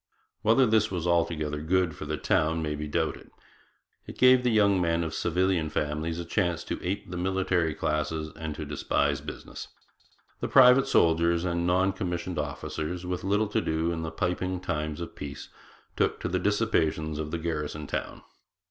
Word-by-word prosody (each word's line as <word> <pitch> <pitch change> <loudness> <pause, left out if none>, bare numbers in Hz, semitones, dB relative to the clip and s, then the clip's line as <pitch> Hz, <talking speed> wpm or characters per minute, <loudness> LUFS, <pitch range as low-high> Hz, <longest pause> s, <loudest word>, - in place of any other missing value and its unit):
Whether 115 +4 +4
this 110 -2 +3
was 90 -3 -3
altogether 80 -3 0
good 85 0 +1
for 75 - -7
the 75 +1 -2
town 80 -4 +1
may 75 -1 -2
be 75 +1 -4
doubted. 75 - -2 0.8
It - - -9
gave 130 0 +6
the 125 - +1
young 100 -4 +4
men 85 0 +1
of 80 -1 -4
civilian 90 -1 +1
families 75 +2 -2
a 85 - -4
tendency 85 -2 -1
to - - -12
ape 100 +1 -3
the 90 - -4
military 90 -3 0
classes 75 +1 -2
and 80 -2 -5
to 75 - -5
despise 70 0 0
business. - - -8 0.7
The - - -2
private 130 +1 +7
soldiers 85 -5 +3
and 85 -1 0
non 95 +2 +2
commissioned 90 -2 -3
officers, 75 +4 -4
with 90 0 -3
little 100 +3 +2
to - - +1
do 80 +1 0
in 80 -1 -3
the 80 - -3
piping 90 +1 -2
times 75 -3 -3
of 85 - -6
peace, 70 0 -7 0.5
took - - +1
to - - -2
the 90 - 0
dissipations 80 -7 0
of 75 -1 -3
the 85 - -2
garrison 75 -2 -3
town. - - -5
85 Hz, 175 wpm, -27 LUFS, 75-95 Hz, 0.8 s, private